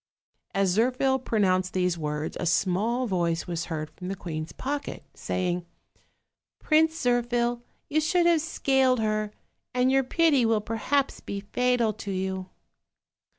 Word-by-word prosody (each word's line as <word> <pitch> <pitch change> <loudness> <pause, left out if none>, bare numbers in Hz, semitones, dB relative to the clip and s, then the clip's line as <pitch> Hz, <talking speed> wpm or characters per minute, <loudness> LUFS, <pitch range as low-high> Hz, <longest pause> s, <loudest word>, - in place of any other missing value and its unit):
As 195 -2 +2
Zirphil 255 +3 +2
pronounced 185 -5 +1
these 180 -1 +1
words, 150 -1 -3
a 175 - -1
small 205 +9 +1
voice 175 -5 0
was 170 -2 -3
heard 155 -2 -4
from 180 - -9
the 195 - -3
queen's 160 -4 -5
pocket, 285 +2 -4
saying: 180 -1 -2 0.9
"Prince 320 +1 +3
Zirphil, 240 -1 +1 0.3
you 310 +2 +1
should 345 +3 +2
have 340 -2 +4
scaled 265 -5 +2
her; 215 -1 0 0.4
and 250 +1 +3
your 270 0 +4
pity 295 -1 +3
will 225 -1 +3
perhaps 230 +6 -1
be 200 - -5
fatal 240 +1 +1
to 205 -1 -8
you." 190 -1 -2
220 Hz, 140 wpm, -27 LUFS, 185-260 Hz, 0.9 s, have